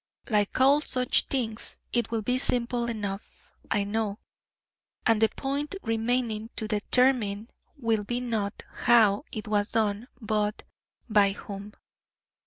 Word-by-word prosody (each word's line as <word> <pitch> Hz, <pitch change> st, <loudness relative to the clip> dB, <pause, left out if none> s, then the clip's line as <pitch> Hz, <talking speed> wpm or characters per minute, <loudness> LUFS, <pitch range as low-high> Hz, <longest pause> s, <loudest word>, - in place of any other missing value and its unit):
Like 205 Hz, +1 st, +1 dB
all 275 Hz, +3 st, +6 dB
such 255 Hz, -4 st, +2 dB
things, 230 Hz, -5 st, -3 dB, 0.2 s
it 235 Hz, -2 st, +1 dB
will 225 Hz, -1 st, -2 dB
be 250 Hz, +4 st, +1 dB
simple 240 Hz, -1 st, 0 dB
enough, 205 Hz, -3 st, -6 dB, 0.2 s
I 205 Hz, -, +1 dB
know, 205 Hz, 0 st, -2 dB, 0.9 s
and 225 Hz, -2 st, +3 dB
the 220 Hz, -, +5 dB
point 285 Hz, +6 st, -3 dB
remaining 225 Hz, -1 st, -1 dB
to 220 Hz, -, -3 dB
determine 220 Hz, 0 st, +2 dB, 0.3 s
will 225 Hz, -5 st, 0 dB
be 240 Hz, +4 st, -2 dB
not 220 Hz, -5 st, -3 dB, 0.2 s
how 225 Hz, 0 st, +5 dB
it 215 Hz, -1 st, -5 dB
was 205 Hz, 0 st, +1 dB
done, 220 Hz, 0 st, 0 dB
but 215 Hz, -2 st, -1 dB, 0.4 s
by 205 Hz, -3 st, +4 dB
whom. 200 Hz, +1 st, -8 dB
225 Hz, 130 wpm, -27 LUFS, 210-245 Hz, 0.9 s, all